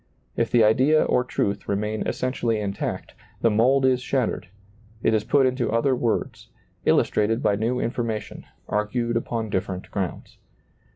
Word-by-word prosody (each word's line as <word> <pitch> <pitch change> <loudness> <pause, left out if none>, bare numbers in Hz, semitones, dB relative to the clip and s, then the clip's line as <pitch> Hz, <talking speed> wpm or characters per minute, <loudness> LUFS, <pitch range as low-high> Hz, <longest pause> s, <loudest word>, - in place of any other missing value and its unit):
If 115 - 0
the 115 -1 +4
idea 130 +8 +4
or 125 - +2
truth 100 -4 -2
remain 105 +2 -1
essentially 120 -3 -1
intact, 100 -2 -4 0.3
the 115 - +3
mold 130 +5 +3
is 130 -1 +3
shattered; 125 -8 -1 0.6
it 110 - +3
is 110 -1 +2
put 135 +4 +3
into 130 -2 0
other 120 +4 +2
words, 120 -2 -2 0.4
illustrated 115 +4 +2
by 100 - +3
new 115 +4 -1
information, 115 -4 -3 0.2
argued 115 +3 -1
upon 115 -2 -2
dif 95 - -1
ferent 95 -1 -7
grounds. 95 -3 -5
115 Hz, 150 wpm, -24 LUFS, 105-125 Hz, 0.6 s, the